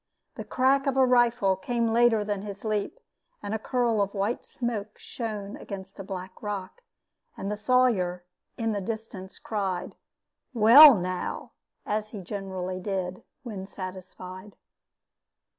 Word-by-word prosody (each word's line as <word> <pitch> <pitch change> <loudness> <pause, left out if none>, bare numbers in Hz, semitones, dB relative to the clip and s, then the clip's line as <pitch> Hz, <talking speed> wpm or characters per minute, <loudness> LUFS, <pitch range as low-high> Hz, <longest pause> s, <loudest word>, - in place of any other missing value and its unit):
The - - -7
crack 270 +2 +2
of 270 -1 +1
a 265 - +6
rifle 240 -5 +3
came 235 +5 -1
later 235 -2 +4
than 205 -1 -2
his 200 0 -8
leap, 215 - -2 0.4
and 205 +1 -3
a 220 - -1
curl 235 -2 +1
of 200 0 -2
white 205 +5 -1
smoke 220 -4 -4
shone 215 -2 -5
against 195 -6 -9
a - - -4
black 185 -1 -7
rock, 205 - -5 0.6
and 195 - -4
the - - -1
Sawyer, 210 -6 +2 0.3
in 225 -1 0
the 205 -2 -2
distance, 210 -2 -6
cried, 195 -5 -3 0.6
"Well, 245 +6 +10
now!" 185 -1 -4 0.3
as 215 0 -1
he 210 -3 -7
generally 185 -1 -5
did 185 -1 -3 0.2
when 200 -6 -6
satisfied. 185 +1 -9
205 Hz, 140 wpm, -27 LUFS, 190-230 Hz, 0.6 s, Well